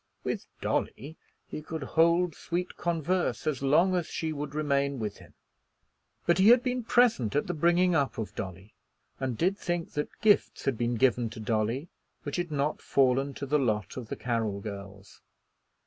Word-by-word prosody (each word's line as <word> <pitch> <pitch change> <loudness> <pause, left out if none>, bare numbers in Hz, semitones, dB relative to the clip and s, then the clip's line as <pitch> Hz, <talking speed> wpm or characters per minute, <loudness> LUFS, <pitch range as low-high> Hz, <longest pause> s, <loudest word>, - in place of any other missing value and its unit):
With - - -3
Dolly 145 +7 -2 0.3
he - - -6
could 155 0 -5
hold 170 +4 +3
sweet 180 +1 -4
converse 175 +1 -1
as 150 -4 -1
long 155 +7 +4
as 175 -2 -1
she 160 -1 -3
would 145 -1 -5
remain 140 -2 +1
with 105 -4 -4
him. - - -17 0.9
But 175 +1 +3
he 195 +3 +7
had 245 +1 +7
been 250 -1 -1
present 225 - +3
at 145 - +2
the 175 - -2
bringing 175 +3 +3
up 140 -4 +1
of 110 - -4
Dolly, 95 +3 -7 0.5
and 130 -4 -2
did 185 - +1
think 175 -1 -2
that 150 - -4
gifts 210 -2 +2
had 135 - +1
been 120 +1 -1
given 120 -1 +2
to 110 - -9
Dolly 110 +6 -1 0.4
which 145 +1 -3
had 175 -1 -2
not 145 0 -1
fallen 135 +1 +2
to - - -4
the 150 +2 +2
lot 105 -6 -1
of 125 -3 -6
the - - -4
Carroll 115 -4 -1
girls. 100 -1 -9
145 Hz, 180 wpm, -29 LUFS, 120-170 Hz, 0.9 s, he